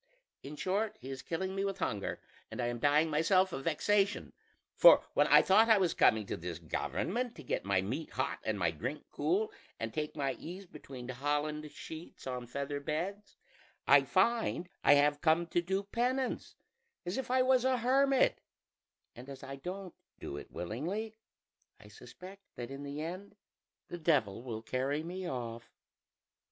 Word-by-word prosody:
"In 145 +2 -8
short, 205 +6 -1
he 135 - -8
is 130 -1 -6
killing 190 +3 -3
me 195 0 -1
with 195 -1 -2
hunger, 105 - -2 0.3
and - - -8
I 120 -1 0
am 120 0 -4
dying 145 +4 +4
myself 185 +5 +3
of 135 - -5
vexation: 200 +5 +1 0.4
for - - +8
when - - +4
I - - +7
thought 220 +4 +5
I 220 - +7
was 185 -4 +2
coming 110 -1 +4
to - - -3
this 85 -1 -5
government 225 - -2
to 155 - -10
get 125 - -2
my 95 -1 +2
meat 130 +11 -4
hot 130 - -2
and 110 -1 -1
my 85 -4 +1
drink 125 - -5
cool, 180 +9 0 0.3
and 115 0 -4
take 150 -1 -3
my 140 -3 -1
ease 185 +4 -8
between 135 -7 -10
holland 145 +3 -2
sheets 160 +3 -10
on 125 -2 -4
feather 140 +3 -3
beds, 185 +8 -4 0.5
I 140 0 +7
find 185 - +1
I 145 - +7
have 145 +1 +3
come 165 +1 +3
to 175 - +2
do 190 +3 -1
penance 250 +5 -1 0.5
as 180 +8 -2
if 265 - -5
I 255 0 +4
was 255 -1 +4
a 260 -1 +2
hermit; 265 +3 +3 0.7
and 125 +3 -11
as 135 -1 -9
I 135 0 -7
don't 185 +4 -6 0.3
do - - -6
it 70 - -8
willingly, 170 - -4 0.7
I - - -15
suspect 190 +2 -12
that 120 +1 -6
in 135 +1 -7
the 145 +1 -5
end 185 +5 -7 0.5
the 175 - -7
Devil 135 - +1
will 115 -3 -6
carry 135 +5 -1
me 180 +1 -5
off. 115 -2 -5
155 Hz, 175 wpm, -32 LUFS, 130-195 Hz, 0.7 s, for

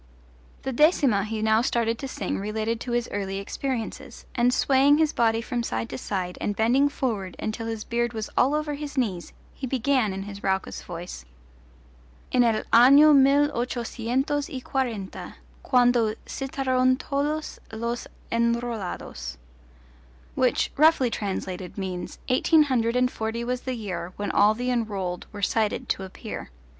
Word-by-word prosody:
The 265 - -2
decima 265 - +3
he 215 0 -3
now 220 0 +4
started 230 -2 0
to 270 - -4
sing 200 -8 -3
related 220 +3 -2
to 245 - -5
his 240 0 0
early 195 -1 -3
experiences, 230 +3 -5
and 245 0 +3
swaying 275 +3 +4
his 315 -1 +2
body 225 -1 +2
from 240 0 -2
side 115 - -3
to 130 - -5
side 185 -3 -3
and 205 - -1
bending 250 +7 +3
forward 215 -10 -3
until 225 +1 -4
his 225 -1 -4
beard 240 0 -1
was 220 -2 -4
all 275 +4 +3
over 300 -1 -1
his 290 0 -6
knees 195 -9 -1 0.2
he 265 - -5
began 255 -3 +1
in 190 0 -4
his 200 0 -8
raucous 190 0 -1
voice: 175 - -7 1.1
En 250 -1 +4
el 225 -2 +2
ano 280 +6 +8
mil 280 +1 +5
ochocientos 250 +3 -1
y 265 - -4
quarenta, 240 -7 -4 0.3
Quando 245 -4 +3
citaron 260 -1 +1
todos 295 +3 -2
los 235 +2 -3 0.2
enrolados, 230 - -2 1.0
which, 255 -1 +1
roughly 300 -5 +5
translated, 190 -3 -4
means: 185 -2 -4
Eighteen 305 +5 +4
hundred 240 -4 0
and 250 0 +2
forty 225 +1 -3
was 250 +1 -2
the 260 -1 -3
year 185 -5 -5
When 205 - -3
all 210 +1 +4
the 250 +2 -1
enrolled 200 -7 -2
were 205 -1 -7
cited 215 +1 0
to - - 0
appear. 190 0 -7
235 Hz, 150 wpm, -25 LUFS, 205-260 Hz, 1.1 s, ano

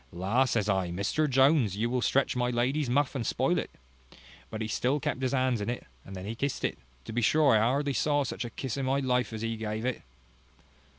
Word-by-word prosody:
La! 100 +9 +1
says 115 -5 0
I, 95 -3 +1
Mr 100 - 0
Jones, 135 - +3
you 115 +3 0
will 125 +1 -1
stretch 135 +2 +1
my 125 0 +1
lady's 125 +4 0
muff, 140 +2 +1
and 130 -4 -2
spoil - - +1
it: - - -4 0.8
but 110 - -6
he 110 - -2
still 125 +6 0
kept 130 - -3
his 130 -1 0
hands 130 -4 +1
in 105 - -2
it: 120 - -4 0.2
and 95 - -10
then 95 0 -7
he 110 - -3
kissed 140 +4 -3
it - - -2 0.3
to - - -7
be 120 - 0
sure 145 +4 +4
I - - +5
hardly 140 +6 +1
ever 130 - -2
saw 145 -1 +2
such 130 - -4
a 120 - -5
kiss 130 +1 -5
in 135 -1 -2
my 135 +1 +2
life 125 -3 0
as 110 0 -5
he 115 0 -1
gave 110 +1 -4
it." 130 -2 -2
125 Hz, 240 wpm, -29 LUFS, 110-135 Hz, 0.8 s, I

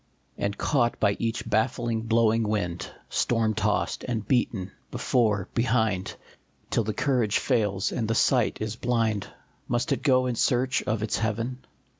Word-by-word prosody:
And 100 0 -2
caught 120 -5 +1
by 100 -1 +3
each 115 -1 -2
baffling, 115 +1 0
blowing 115 0 +3
wind, 100 -6 -2 0.2
Storm 115 -2 +1
tossed - - 0
and 110 -4 -2
beaten, 110 -7 0 0.2
before, 105 -6 +1
behind, 110 -6 0 0.6
Till 115 - +2
the 110 - -2
courage 120 -3 +1
fails 105 -7 0
and 115 -3 -2
the 115 - 0
sight 125 +1 +3
is 110 0 -2
blind, 115 -4 0 0.4
Must 120 0 -1
it - - 0
go 130 -3 +3
in 125 - 0
search 125 +3 +1
of 110 0 0
its 105 -2 -1
heaven 115 +3 -2
115 Hz, 150 wpm, -26 LUFS, 105-120 Hz, 0.6 s, by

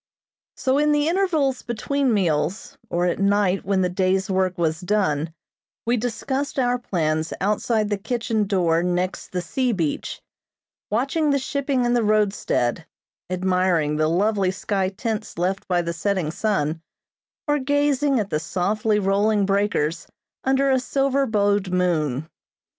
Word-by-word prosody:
So 265 +2 +1
in 300 0 +3
the 295 +1 +2
intervals 325 -8 +1
between 265 +3 -1
meals, 180 -2 0
or 175 +1 0
at 175 - 0
night 200 -1 +2
when 195 -1 +1
the 180 - +2
day's 190 +1 0
work 185 -1 +1
was 160 0 0
done, 170 -6 0 0.5
we 235 +2 +2
discussed 245 +5 -2
our 245 -1 +1
plans 160 -7 -1
outside 210 +2 0
the 205 - 0
kitchen 220 -1 -1
door 170 -4 +2
next 180 +1 -1
the 180 -1 -2
sea 255 +6 0
beach, 165 -7 -2 0.7
watching 275 +8 +1
the 280 - +3
shipping 270 -1 -1
in 240 - +2
the 240 - +3
roadstead, 205 - +1 0.4
admiring 180 -4 +1
the 155 0 +2
lovely 195 +3 +1
sky 190 0 -1
tints 215 +1 -4
left 185 +3 -1
by 175 -2 +1
the 170 0 -3
setting 185 -3 -1
sun, 165 -6 -1 0.7
or 295 0 +2
gazing 285 -1 +2
at 205 -2 -3
the 150 - +1
softly 210 +5 0
rolling 205 +1 +2
breakers 195 -5 0 0.4
under 270 +1 +2
a 260 - +3
silver 275 +1 +1
bowed 205 -2 +1
moon. 160 -6 0
200 Hz, 145 wpm, -23 LUFS, 180-245 Hz, 0.7 s, in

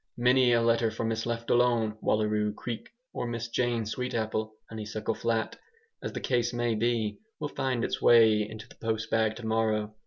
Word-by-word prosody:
Many 125 +1 +4
a 115 0 +3
letter 115 0 +3
for 110 +1 -4
Mrs 115 0 -1
Leftalone, 115 -1 +1
Wallaroo 105 -1 +1
Creek, 115 0 -6 0.2
or 120 - -3
Miss 115 0 -4
Jane 120 -1 0
Sweetapple, 110 -2 -2 0.2
Honeysuckle 110 0 -4
Flat, 115 0 -1 0.4
as - - -4
the - - -3
case 120 -1 0
may 120 -1 0
be, 110 -2 0 0.2
will 150 -2 -3
find 130 -4 -1
its - - -3
way 110 -3 +6
into 110 +1 -9
the - - -15
post 110 -1 -2
bag 110 -1 +2
tomorrow. 110 -2 0
115 Hz, 165 wpm, -29 LUFS, 110-120 Hz, 0.4 s, way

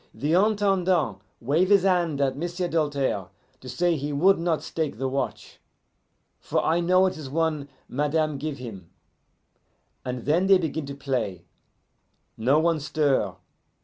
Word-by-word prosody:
"The 150 +3 -1
Intendant 185 - +2 0.2
wave 155 +10 +1
his 200 -2 +5
hand 175 -6 +1
at 135 -1 +1
M'sieu' 175 +4 -3
Doltaire 140 - -1 0.3
to 130 - -10
say 175 +5 +1
he 145 0 -3
would 180 +7 +4
not 165 -2 0
stake 160 -3 -3
the 135 - -1
watch, 135 +1 -4 0.8
for - - -1
I 165 +2 +2
know 185 +2 +4
it 185 - -1
is 150 -4 -7
one 155 -1 -1 0.2
madame 150 +1 0
give 150 0 -4
him; 105 -9 -9 1.1
and 125 -2 -5
then 170 +7 +2
they 195 -1 +7
begin 160 -4 -3
to 140 - -6
play. 120 - -3 0.9
No 130 +6 +2
one 165 0 +2
stir. 140 - 0
155 Hz, 145 wpm, -25 LUFS, 135-175 Hz, 1.1 s, they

